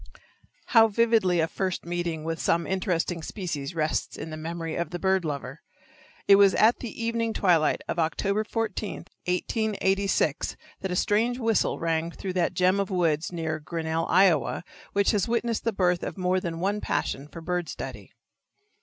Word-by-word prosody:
How 225 -2 +8
vividly 220 -5 +3
a 160 - +1
first 185 0 -3
meeting 170 -2 -2
with 165 0 -3
some 170 0 +1
interesting 180 -2 -1
species 165 -5 -5
rests 155 -1 -1
in 160 - -6
the - - -4
memory 165 +1 -4
of 170 - -2
the 175 - -4
bird 190 0 +1
lover! 140 -2 -5 0.7
It 200 - +8
was 200 -1 +6
at 225 +3 +4
the 240 - -5
evening 230 -1 0
twilight 170 -7 +2
of - - -2
October 200 +6 0
14, 220 -2 -3 0.2
1886, 195 - 0 0.2
that 190 - -3
a 180 - -1
strange 225 +6 +2
whistle 225 -3 +1
rang 165 0 0
through 185 +2 -5
that 180 0 0
gem 185 +2 +3
of 200 - -1
woods 170 -4 +1
near 160 -2 -3
Grinnell, 160 +1 -2
Iowa, 175 -4 +3 0.3
which 200 0 +3
has 205 -4 +1
witnessed 235 -1 -1
the 230 - +2
birth 180 -3 +1
of - - -5
more 185 0 +1
than 170 -2 -4
one 200 +3 0
passion 140 +2 -2
for 165 - -10
bird 175 0 -2
study. - - -7
180 Hz, 170 wpm, -26 LUFS, 165-200 Hz, 0.7 s, How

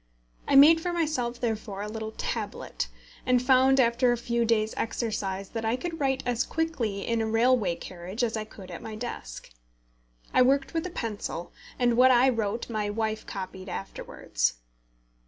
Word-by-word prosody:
I - - +2
made 315 +4 +8
for 355 - -1
myself 300 -8 -1
therefore 215 -4 -3
a - - -4
little 220 0 -5
tablet, - - -3 0.4
and 250 -1 +3
found 260 +1 +4
after 240 0 +4
a 240 - +1
few 235 0 0
days' 220 -1 +1
exercise 200 -4 -2
that 225 -1 -4
I 225 +2 +1
could 330 +5 -5
write 270 -2 0
as 245 0 +1
quickly 260 -12 -2
in 230 -1 0
a 220 - 0
railway 225 -5 +3
carriage 185 +6 -6
as 230 -1 0
I 220 - -2
could 190 -3 -12
at 170 - -7
my 220 -1 -7
desk. 215 - -7 0.8
I - - +5
worked 275 +4 +3
with 330 +2 -1
a - - -6
pencil, 210 - -5 0.2
and 240 -1 +2
what 255 +1 +7
I 255 +1 +6
wrote 225 -2 -1
my 215 -3 -2
wife 220 +1 -2
copied 190 0 -6
afterwards. - - -2
230 Hz, 175 wpm, -27 LUFS, 210-255 Hz, 0.8 s, made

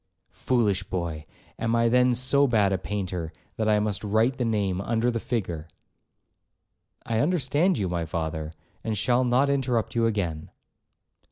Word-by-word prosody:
'Foolish 105 -7 +1
boy,—am 90 +5 -4
I 115 0 +3
then 125 +1 +4
so 140 +3 +3
bad 105 -5 +2
a 95 - 0
painter, 90 -5 -4 0.3
that 110 -1 0
I 105 -1 +4
must 105 -2 -2
write 110 +5 +1
the 125 - +1
name 100 -4 0
under 115 +3 0
the 115 - -2
figure.' 90 -11 -3 1.4
'I 110 -1 0
understand 160 +3 +2
you, 100 -4 -1
my 85 -1 -2
father, 80 -1 -3 0.3
and 110 -1 -2
shall 120 +4 +2
not 125 +3 +3
interrupt 130 -5 0
you 115 -1 +2
again.' 85 -8 -2
110 Hz, 150 wpm, -26 LUFS, 95-125 Hz, 1.4 s, then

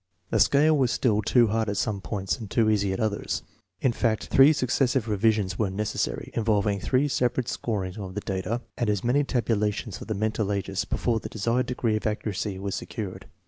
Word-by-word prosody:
The - - +2
scale 155 +3 +5
was 130 -4 +2
still 115 -4 +2
too 120 +3 +4
hard 110 0 0
at 100 - -2
some 100 -2 -1
points, 95 +2 -2
and 110 -4 -7
too 110 0 +3
easy 100 -2 +1
at 95 - -3
others. 110 -2 -1 0.4
In 130 - +3
fact, 115 -2 -1
three 135 +3 +7
succes 135 -2 +1
sive 125 -5 0
revisions 105 -2 +1
were 105 -3 +1
necessary, 100 - -2
involving 105 -3 +1
three 130 +7 +1
separate 125 -2 0
scorings 100 -3 -3
of 95 -2 -7
the 105 - -2
data 100 +5 -2 0.2
and 120 -3 +1
as 105 -3 0
many 130 +5 +3
tabulations 110 -5 -1
of - - -8
the 110 - -2
mental 110 0 -1
ages, 95 -1 -2
before 115 -2 0
the - - -7
desired 115 +4 0
degree 120 -3 0
of 110 - -2
accuracy 105 -2 -2
was 100 0 -4
secured. 105 -6 -6
110 Hz, 200 wpm, -26 LUFS, 100-120 Hz, 0.4 s, three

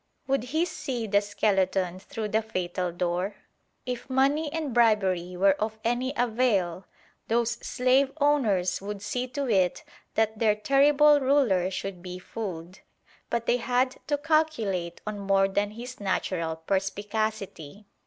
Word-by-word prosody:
Would 270 -2 0
he 315 +7 0
see 265 -8 -4
the 205 -1 +3
skeleton 190 -3 0
through 215 +2 -5
the 220 +2 +2
fatal 185 -4 -3
door? 180 +3 -2 0.5
If 250 +1 -5
money 280 +4 +2
and 310 -5 -3
bribery 190 -6 +2
were 195 +1 +5
of 220 0 -2
any 245 +3 0
avail, 220 -7 +1 0.4
those 235 +1 +1
slave 260 +2 +2
owners 225 -13 +2
would 200 0 -6
see 250 +4 -2
to 270 +2 -3
it 190 -6 +2 0.3
that 220 -1 +1
their 215 -2 +3
terrible 290 +5 +5
ruler 260 -10 +2
should 190 -1 -5
be 180 0 -7
fooled. 185 -3 -7 0.5
But 235 -1 -1
they 245 - +3
had 250 +1 0
to 290 -1 +1
calculate 285 - 0
on 210 -1 -4
more 195 -1 +3
than 205 +1 0
his 240 +4 -9
natural 185 -4 -1
perspicacity. 200 0 -3
215 Hz, 140 wpm, -27 LUFS, 190-255 Hz, 0.5 s, were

